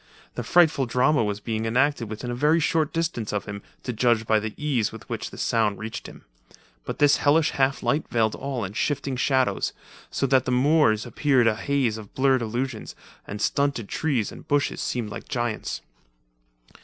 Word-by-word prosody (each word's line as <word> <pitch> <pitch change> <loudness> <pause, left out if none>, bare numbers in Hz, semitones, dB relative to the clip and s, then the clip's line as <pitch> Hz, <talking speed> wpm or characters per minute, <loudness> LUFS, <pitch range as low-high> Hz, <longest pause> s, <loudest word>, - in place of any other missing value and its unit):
The - - -4
frightful 160 -7 +3
drama 125 +2 +3
was 105 -1 -2
being 110 +1 -3
enacted 130 0 +1
within 110 +3 -5
a - - -2
very 150 +6 +3
short 160 -1 +1
distance 165 -10 -2
of 105 -1 -2
him, 100 0 -6 0.2
to 125 - -3
judge 115 -1 +2
by 110 0 +3
the 105 0 -5
ease 135 -8 0
with - - -11
which - - -4
the - - -12
sounds 110 -3 +1
reached 110 0 -6
him. - - -13 0.6
But - - -4
this 145 -1 +5
hellish 150 +2 +3
half 135 0 0
light 150 +2 0
veiled 110 -3 +1
all 135 -4 -4
in 95 - -7
shifting 140 +3 -1
shadows, 130 0 +1 0.4
so - - -1
that 130 -1 +3
the 130 - -1
moors 125 -4 +3
appeared 130 +1 +2
a 115 -1 +3
haze 120 -2 0
of 105 -2 -13
blurred 130 -1 +3
illusions, 120 +1 -4 0.3
and 100 - -6
stunted 140 -3 0
trees, 130 -9 -1
and - - -12
bushes 145 0 0
seemed 115 -4 -2
like - - -8
giants. 120 -5 -2
125 Hz, 185 wpm, -25 LUFS, 110-140 Hz, 0.6 s, this